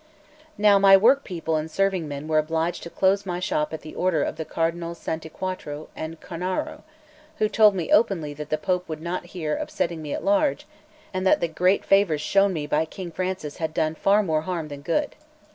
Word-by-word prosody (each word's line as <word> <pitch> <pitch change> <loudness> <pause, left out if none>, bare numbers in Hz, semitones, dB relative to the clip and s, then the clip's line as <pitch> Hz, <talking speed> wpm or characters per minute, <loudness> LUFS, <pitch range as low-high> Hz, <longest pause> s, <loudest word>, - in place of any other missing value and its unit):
Now 205 -1 +5
my 195 0 +8
workpeople 190 - +2
and 155 +1 -3
serving 190 -2 0
men 145 +1 -6
were 155 -1 +3
obliged 160 +2 -1
to 170 - -7
close 195 +3 +2
my 180 -2 -3
shop 150 -4 -1
at 160 - -6
the 155 - -10
order 175 -5 +1
of - - -3
the 160 - -4
Cardinals 170 +1 -2
Santi 160 0 -5
Quattro 155 -4 -5
and 160 +1 -6
Cornaro, 180 +2 -4 0.6
who 215 - +2
told 210 -2 +5
me 175 -4 -3
openly 190 -9 +3
that 150 +1 -8
the 155 - +1
Pope 180 -1 -1
would 155 -1 -4
not 175 +2 -4
hear 155 -3 -1
of - - -3
setting 170 -2 -2
me 150 -2 -6
at - - -3
large, 300 -1 +2 0.5
and 185 0 -2
that - - +4
the 170 - 0
great 180 +4 +1
favours 195 -6 +3
shown 195 +6 +3
me 155 -5 -3
by 150 +1 +1
King 175 +2 -8
Francis 185 -4 -4
had 160 -1 -3
done 155 0 +1
far 200 +6 +3
more 160 -4 0
harm 165 -2 -4
that 140 -1 -8
good. 285 - -1
170 Hz, 210 wpm, -24 LUFS, 155-195 Hz, 0.6 s, my